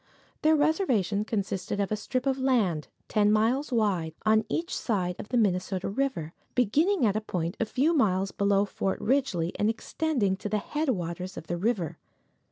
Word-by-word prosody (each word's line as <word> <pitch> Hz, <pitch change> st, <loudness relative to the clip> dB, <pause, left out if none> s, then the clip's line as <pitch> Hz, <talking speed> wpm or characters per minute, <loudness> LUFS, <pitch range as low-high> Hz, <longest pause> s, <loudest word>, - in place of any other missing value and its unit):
Their 315 Hz, +1 st, +5 dB
reservation 265 Hz, -, +1 dB
consisted 200 Hz, -2 st, -2 dB
of 200 Hz, 0 st, 0 dB
a -, -, +2 dB
strip 255 Hz, +5 st, -3 dB
of 270 Hz, -1 st, +1 dB
land, 215 Hz, -, +1 dB, 0.2 s
ten 210 Hz, -1 st, +3 dB
miles 240 Hz, +7 st, +2 dB
wide, 190 Hz, -9 st, 0 dB
on 220 Hz, 0 st, +4 dB
each 340 Hz, +2 st, -2 dB
side 180 Hz, -6 st, -1 dB
of -, -, -7 dB
the 245 Hz, -, +1 dB
Minnesota 190 Hz, -3 st, 0 dB
river, 195 Hz, -, -2 dB, 0.2 s
beginning 295 Hz, -, +3 dB
at 205 Hz, -2 st, +2 dB
a 215 Hz, -, 0 dB
point 175 Hz, -3 st, -3 dB
a 225 Hz, -, +1 dB
few 275 Hz, +9 st, +1 dB
miles 195 Hz, -, +2 dB
below 200 Hz, 0 st, +2 dB
Fort 195 Hz, -1 st, -2 dB
Ridgely 220 Hz, -10 st, 0 dB
and 210 Hz, -, +3 dB
extending 230 Hz, -3 st, 0 dB
to 210 Hz, -, -5 dB
the 215 Hz, -, +1 dB
headwaters 185 Hz, -, -2 dB
of -, -, -7 dB
the 175 Hz, -, -2 dB
river. 175 Hz, -5 st, -1 dB
210 Hz, 175 wpm, -28 LUFS, 185-260 Hz, 0.2 s, Their